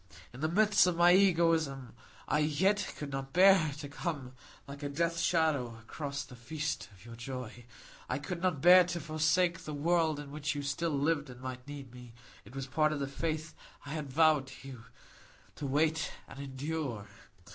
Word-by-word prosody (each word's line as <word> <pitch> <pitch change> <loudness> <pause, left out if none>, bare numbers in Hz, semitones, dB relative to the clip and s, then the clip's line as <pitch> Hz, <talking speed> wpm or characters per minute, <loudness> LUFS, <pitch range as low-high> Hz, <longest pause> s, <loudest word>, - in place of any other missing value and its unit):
In 125 - -10
the 155 +2 0
midst 205 0 +4
of 180 - +1
my 175 +1 +6
egoism, 165 - +2 0.3
I 150 - +2
yet 185 +8 +1
could 145 -2 -6
not 135 0 -5
bear 185 -4 +6
to 145 -1 -6
come 140 -3 -5 0.3
like 140 +1 -9
a 145 - -3
death 170 +3 -1
shadow 145 -10 +1
across 140 +5 -5
the 125 - -13
feast 150 +5 -4
of 95 +1 -18
your 115 0 -10
joy. 120 -1 -7 0.4
I - - 0
could 170 +4 -5
not 180 -7 0
bear 180 +1 +9
to 175 0 -3
forsake 165 +2 +1
the 150 - -6
world 160 0 +1
in 145 -1 -8
which 150 +1 -3
you 145 - -3
still 140 +4 -1
lived 145 0 0
and 125 -1 -11
might 130 0 -7
need 140 -4 -9
me; 125 -2 -12 0.3
it 110 +6 -14
was 135 -1 -4
part 155 +3 +1
of 150 - -2
the 140 - -1
faith 155 +3 -3 0.3
I 140 - -7
had 150 -3 -4
vowed 155 -2 +4
to 135 +1 -11
you,—to 120 +3 -12
wait 155 +3 +1 0.2
and 135 - -11
endure. 140 -4 -4
145 Hz, 185 wpm, -32 LUFS, 135-165 Hz, 0.4 s, bear